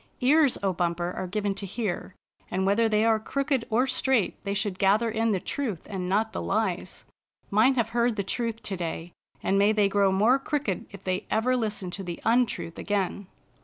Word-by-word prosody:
"Ears, 285 +1 +4
O 195 -1 +1
Bumper, 175 0 -1
are 185 - -3
given 205 +1 -1
to 195 +1 -5
hear, 195 -2 -4 0.3
and 190 +1 -1
whether 220 +3 +3
they 215 0 +2
are 225 -1 +3
crooked 275 +1 -1
or 240 +4 +3
straight 260 -4 +1
they 200 0 -2
should 200 -2 -2
gather 210 +4 +3
in 225 +1 +1
the 195 - +1
truth 225 - -3
and 185 -3 -4
not 215 +3 +1
the - - -3
lies. 195 -3 -2 0.5
Mine 225 +6 +4
have 230 -3 +1
heard 235 0 +1
the 200 - -1
truth 230 +3 -3
to 195 - -2
day, 170 -1 -5 0.3
and 195 +1 +2
may 205 +2 +5
they 210 -2 +3
grow 200 -1 +3
more 220 +8 +4
crooked 275 - -2
if 200 -1 -12
they 185 0 -2
ever 250 +4 +2
listen 210 -6 -2
to 195 - -5
the 175 -2 -5
un 240 +2 +4
truth 165 - -6
again." 200 -1 -2
210 Hz, 200 wpm, -27 LUFS, 190-230 Hz, 0.5 s, may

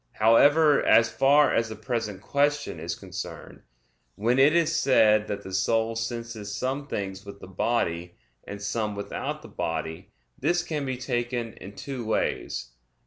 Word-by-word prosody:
However, 145 +7 +5
as 115 -1 +5
far 140 +5 +4
as 115 -1 +1
the 110 - -6
present 110 -2 -4
question 145 - 0
is 85 +1 -4
concerned, - - -8 0.5
when 120 +5 +1
it 145 +4 +6
is 165 -1 +2
said 110 -8 +4
that 100 0 -4
the 95 - -8
soul 115 +4 +1
senses 115 -3 -4
some 135 +4 -3
things 95 -5 -4
with 100 -1 -10
the - - -10
body, 90 -3 -1 0.3
and 100 - -8
some 105 +1 -2
without 100 - -5
the - - -10
body, 80 0 -4 0.3
this 175 0 +1
can 150 -5 -3
be 130 -1 -2
taken 120 -2 -2
in 100 +2 -11
two 135 -4 -6
ways. 85 - -2
115 Hz, 155 wpm, -26 LUFS, 100-135 Hz, 0.5 s, it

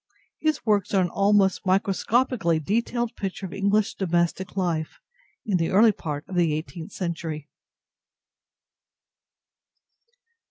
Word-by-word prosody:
His 310 -1 0
works 205 -3 +1
are 190 - +5
an 175 - -2
almost 200 -1 +3
microscopically 195 0 +1
detailed 230 +6 -1
picture 195 -1 -4
of 180 - -7
English 200 +2 +1
domestic 175 +1 -1
life 165 -4 -1 0.5
in 200 -4 +1
the 165 -1 0
early 215 +4 +6
part 150 -6 -6
of - - -9
the 170 -4 +2
eighteenth 165 +3 -6
century. 165 -5 -4
190 Hz, 115 wpm, -25 LUFS, 170-205 Hz, 0.5 s, early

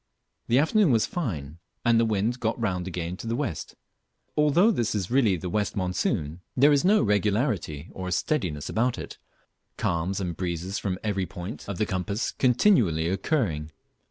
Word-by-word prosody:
The 120 - +3
afternoon 160 +4 +4
was 115 -2 +3
fine, 85 - -4 0.3
and 120 -1 +5
the 115 - +3
wind 110 +4 0
got 115 0 -1
round 90 -5 -1
again 90 0 -4
to 115 - -7
the 115 - 0
west; - - -4 0.6
but - - +3
although 170 +9 +5
this 120 - 0
is 95 0 -2
really 120 -7 +4
the 90 - -5
west 105 +4 -1
monsoon, 90 -4 -1 0.2
there 140 +4 +6
is 140 - +3
no 205 +4 +4
regularity 105 - 0
or 95 -1 -5
steadiness 90 - -1
about 120 +2 0
it, - - -8 0.6
calms 85 +4 -1
and 90 -3 -3
breezes 90 +2 -3
from 95 -2 -2
every 100 -4 -1
point 90 +5 -7
of 100 - -3
the 105 - +1
compass 100 +3 -2
continually 120 - +3
occurring. 95 - -1
100 Hz, 170 wpm, -26 LUFS, 90-120 Hz, 0.6 s, there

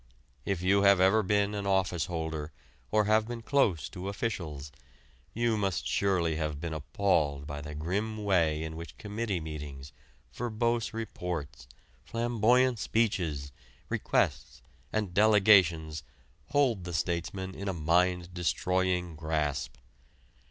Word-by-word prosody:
If 95 -3 -1
you 100 +2 +4
have 100 -1 +6
ever 95 +4 +5
been 100 +1 +1
an 100 -1 -3
office 90 -4 +1
holder 80 -3 -4 0.4
or 105 0 +3 0.2
been 115 +1 -7
close 110 - +2
to 95 0 -6
officials, 85 -10 -4 0.6
you 115 -1 +1
must 95 -7 -1
surely 90 -5 +1
have 75 -2 -2
been 85 0 -4
appalled 75 -3 0
by 75 0 -6
the 75 0 -7
grim 100 +8 -2
way 80 -6 +2
in 80 0 -5
which 85 +1 -9
committee 105 -2 -3
meetings, 75 -4 -7 0.4
verbose 115 0 -1
reports, 85 - -5 0.4
flamboyant 120 +1 +2
speeches, 85 -12 0 0.4
requests, 65 -4 -1 0.3
and 105 -5 -2
delegations 95 -7 +4 0.5
hold 135 -9 +2
the 90 0 -6
statesman 90 +3 -2
in 100 - -6
a - - +1
mind 90 +2 +1
destroying 90 0 0
grasp. 75 -4 -2
90 Hz, 125 wpm, -30 LUFS, 80-105 Hz, 0.6 s, have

